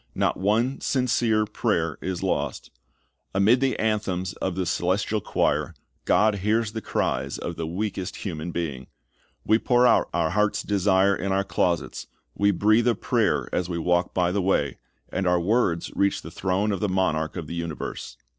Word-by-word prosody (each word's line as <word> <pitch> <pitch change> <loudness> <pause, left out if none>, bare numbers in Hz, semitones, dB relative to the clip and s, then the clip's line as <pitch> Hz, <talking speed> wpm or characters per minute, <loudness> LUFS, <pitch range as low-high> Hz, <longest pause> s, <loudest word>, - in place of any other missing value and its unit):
Not - - +1
one 115 +7 +1
sincere 115 -4 +1
prayer 100 -7 -1
is 95 -2 -3
lost. - - -2 0.6
Amid 105 +6 +4
the 135 -1 +1
anthems 100 -4 -1
of 95 -2 -3
the 95 - -1
celestial 95 +5 0
choir, - - 0 0.3
God 105 -1 +3
hears 110 +2 +1
the 110 0 -5
cries 65 -7 -1
of 85 - -5
the 80 0 -4
weakest 95 +1 -3
human 85 -4 -5
being. 75 -7 -4 0.6
We 110 +1 +4
pour 125 0 +3
out - - +4
our 85 -2 0
heart's 105 0 +1
desire 100 -1 +3
in 100 0 -3
our 95 +1 +2
closets, 85 -7 -1 0.3
we 100 - +2
breathe 110 +4 +3
a 120 - +3
prayer - - 0
as 90 0 -1
we 85 - -2
walk 90 +1 +1
by 90 -1 +1
the 100 +1 0
way, 80 -7 0 0.3
and 95 - -1
our 90 0 +3
words 90 -3 +1
reach 100 0 +1
the - - -9
throne 95 +3 0
of 100 - -2
the 105 - 0
Monarch 85 -4 0
of 80 - -4
the 75 - -7
universe. 85 -2 -5
95 Hz, 175 wpm, -25 LUFS, 85-105 Hz, 0.6 s, Amid